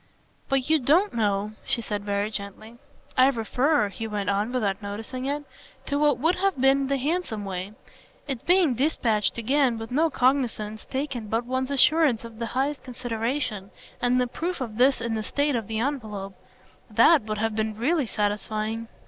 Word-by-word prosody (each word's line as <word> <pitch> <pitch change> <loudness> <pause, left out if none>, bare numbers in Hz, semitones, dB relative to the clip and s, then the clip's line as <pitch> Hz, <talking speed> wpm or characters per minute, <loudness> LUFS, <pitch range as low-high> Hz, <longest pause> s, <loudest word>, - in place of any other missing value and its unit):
"But 270 -1 +1
you 315 0 +4
don't 325 +10 +3
know," 210 -2 0
she - - 0
said 210 -3 -4
very 205 +1 -1
gently. 215 +3 -7 0.4
"I 260 +1 +6
refer," 250 0 +1
he 225 +3 -6
went 205 -2 -1
on 205 +4 0
without 210 -5 -1
noticing 220 +5 -5
it, 290 +2 -2 0.4
"to 285 0 -1
what 295 -1 +3
would 325 +8 +1
have 385 -5 0
been 270 +1 +4
the 275 0 +1
handsome 275 - -2
way. 190 +1 -5 0.5
Its 265 -4 -3
being 355 -6 +4
dispatched 235 -6 +1
again, 250 +1 +2
with 225 +1 -7
no 315 +5 +3
cognisance 245 -6 0
taken 265 -5 -4
but 225 +3 -1
one's 260 +1 -1
assurance 280 -3 +4
of 230 -1 -11
the 230 - -2
highest 275 +2 0
consideration, 235 -3 -3 0.3
and 245 +1 +3
the 250 - +2
proof 335 +9 -4
of 225 -5 -5
this 260 +2 +4
in 230 -1 -2
the 220 - -1
state 285 +6 0
of 225 -4 -2
the 220 - -3
envelope 215 -7 -3 0.6
THAT 330 -3 +6
would 215 -1 -3
have 220 0 -1
been 215 -1 -2
really 280 +3 +1
satisfying." 215 +2 -2
240 Hz, 175 wpm, -25 LUFS, 215-275 Hz, 0.6 s, I